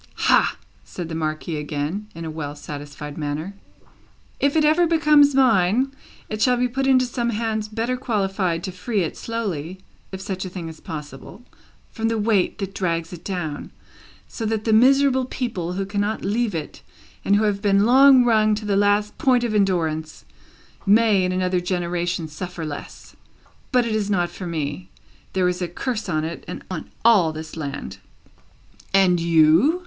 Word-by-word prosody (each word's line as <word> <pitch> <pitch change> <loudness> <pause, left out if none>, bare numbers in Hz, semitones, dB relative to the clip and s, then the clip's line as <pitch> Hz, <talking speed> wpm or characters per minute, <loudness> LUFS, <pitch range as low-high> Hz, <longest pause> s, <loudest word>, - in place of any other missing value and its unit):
"Hah!" - - +3 0.3
said 175 -3 -7
the - - -5
Marquis 155 0 -3
again, 150 +7 -3
in 165 0 -6
a 160 - -4
well 150 -2 -5
satisfied 145 0 -8
manner. 150 +5 -3 0.9
"If 280 +1 +1
it 310 -1 +4
ever 325 +3 +4
becomes 300 -3 +5
mine, 245 0 +3 0.4
it 215 0 -5
shall 250 0 +4
be 250 +1 +2
put 270 +2 -2
into 255 -1 +4
some 240 -1 -2
hands 220 -1 -2
better 230 +4 -2
qualified 195 -8 -1
to 190 - -4
free 195 +4 -2
it 165 - -3
slowly 190 -7 -4 0.3
(if 190 - -6
such 190 -1 -4
a 185 - -5
thing 175 -2 -6
is 160 -1 -9
possible) 150 - -9 0.5
from 225 -1 -2
the 225 0 0
weight 210 -3 +1
that 195 -2 -5
drags 170 -3 -2
it 175 -1 -10
down, 175 -7 -4 0.6
so 230 - -7
that 220 -1 -1
the 220 - +1
miserable 260 +2 +4
people 205 -10 -3
who 195 +1 -2
cannot 205 +2 -2
leave 215 0 0
it 155 - -6 0.4
and 200 - +3
who 210 - +2
have 205 -2 0
been 200 0 +3
long 260 +1 +7
wrung 215 -2 +3
to 210 0 -6
the 205 -1 +1
last 205 +1 +2
point 250 -2 +3
of 235 -2 -1
endurance, 165 -6 0 0.6
may, 210 -1 +4
in 180 - 0
another 185 0 0
generation, 175 -1 -2
suffer 170 +2 -6
less; 150 -2 -8 0.6
but 250 -2 +3
it 230 - -2
is 210 -2 -1
not 175 -4 0
for 185 - -7
me. 160 +1 -4 0.4
There 185 -1 +2
is 180 0 -2
a 180 - -1
curse 215 +4 -4
on 155 -3 0
it, 165 +1 -5
and - - -7
on 170 -4 -5 0.2
all 200 -9 +5
this 155 0 -8
land." 140 -3 -6 1.0
"And 185 -3 +4
you?" 165 - +4
195 Hz, 175 wpm, -22 LUFS, 165-230 Hz, 1.0 s, long